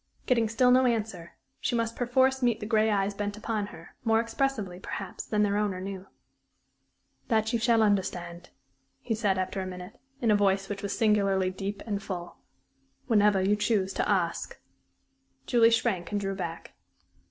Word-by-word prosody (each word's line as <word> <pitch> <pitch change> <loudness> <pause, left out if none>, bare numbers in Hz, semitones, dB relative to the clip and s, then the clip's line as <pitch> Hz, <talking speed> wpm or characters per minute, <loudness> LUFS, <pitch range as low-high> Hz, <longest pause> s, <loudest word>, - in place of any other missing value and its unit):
Getting 230 -3 +2
still 250 +3 +3
no 255 0 +5
answer, 210 -8 -2 0.3
she - - -1
must 230 -1 -1
perforce 260 +2 +2
meet 240 -3 +2
the - - -5
gray 220 0 +2
eyes 200 -1 +1
bent 205 +1 -4
upon 215 -1 -2
her, 165 -3 -13
more 225 -1 +3
expressively, 230 -5 -2
perhaps, - - -6
than 210 -1 +1
their 205 0 +1
owner 205 -3 -1
knew. 190 0 -6 1.2
"That 220 0 +1
you 235 - +2
shall 230 -1 +3
understand," 175 -4 -1 0.5
he 230 - -2
said, 210 -4 +1
after 185 +1 -2
a 185 - -4
minute, 180 +5 -9 0.2
in 230 -3 +2
a - - +5
voice 195 -1 +1
which 200 -1 -4
was 200 - -3
singularly 195 -4 +2
deep 195 +2 -5
and 205 -2 -2
full, 175 -3 -6 0.7
"whenever 205 -4 +3
you 200 +2 +3
choose 205 -2 0
to - - -1
ask." 180 -4 -1 0.9
Julie 230 -2 +5
shrank 225 -6 0
and 205 - 0
drew 195 -1 -2
back. 170 -3 -6
205 Hz, 170 wpm, -28 LUFS, 190-225 Hz, 1.2 s, no